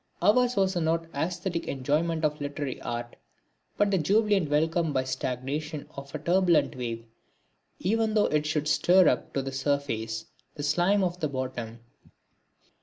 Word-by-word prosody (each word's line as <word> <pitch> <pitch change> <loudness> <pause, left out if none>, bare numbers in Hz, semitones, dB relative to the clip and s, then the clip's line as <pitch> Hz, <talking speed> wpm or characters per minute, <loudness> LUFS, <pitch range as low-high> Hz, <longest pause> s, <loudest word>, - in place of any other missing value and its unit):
Ours 245 +6 +3
was 190 -1 +2
not 165 -1 +1
the - - -18
æsthetic 170 +3 -2
enjoyment 155 +4 0
of 150 0 -1
literary 145 -2 -4
art, 120 0 -5 0.6
but 205 -1 +3
the 190 - +2
jubilant 200 0 +2
welcome 160 +2 +1
by 130 - +1
stagnation 140 +4 -3
of 140 +1 -8
a - - 0
turbulent 170 0 +2
wave, 115 -2 -4 0.7
even 220 +3 0
though 210 - +4
it 150 0 0
should 150 -1 -1
stir 175 +4 +5
up 125 - +1
to 135 - 0
the 135 - -4
surface 135 -5 -2 0.3
the 145 - -5
slime 175 +7 +2
of 180 -1 -1
the 155 - 0
bottom. 125 -4 -5
155 Hz, 155 wpm, -27 LUFS, 135-180 Hz, 0.7 s, stir